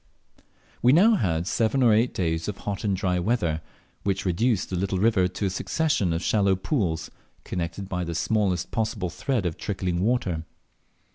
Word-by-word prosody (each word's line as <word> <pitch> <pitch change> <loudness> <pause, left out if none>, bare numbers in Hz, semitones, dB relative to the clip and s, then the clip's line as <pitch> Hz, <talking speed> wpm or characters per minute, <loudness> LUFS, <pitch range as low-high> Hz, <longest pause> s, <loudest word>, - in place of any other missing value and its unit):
We 125 +2 +5
now 205 +9 +6
had 85 - 0
seven 115 +7 +1
or 115 -3 +6
eight 115 +4 +3
days 80 -2 -1
of 105 - -3
hot 100 0 -4
and 100 -3 0
dry 90 -1 0
weather, 85 -6 0 0.4
which 100 -1 -1
reduced 100 +4 +1
the - - -1
little 95 +1 -1
river 95 -2 +3
to 90 +3 -4
a - - +1
succession 150 - 0
of 80 +1 -1
shallow 100 -3 +3
pools 95 - -1 0.3
connected 90 +2 -4
by 90 -1 -2
the 85 -1 -4
smallest 95 -1 0
possible 105 -5 -2
thread 110 - -1
of 85 -2 -2
trickling 95 -3 -2
water. 95 -7 0
95 Hz, 170 wpm, -25 LUFS, 90-110 Hz, 0.4 s, now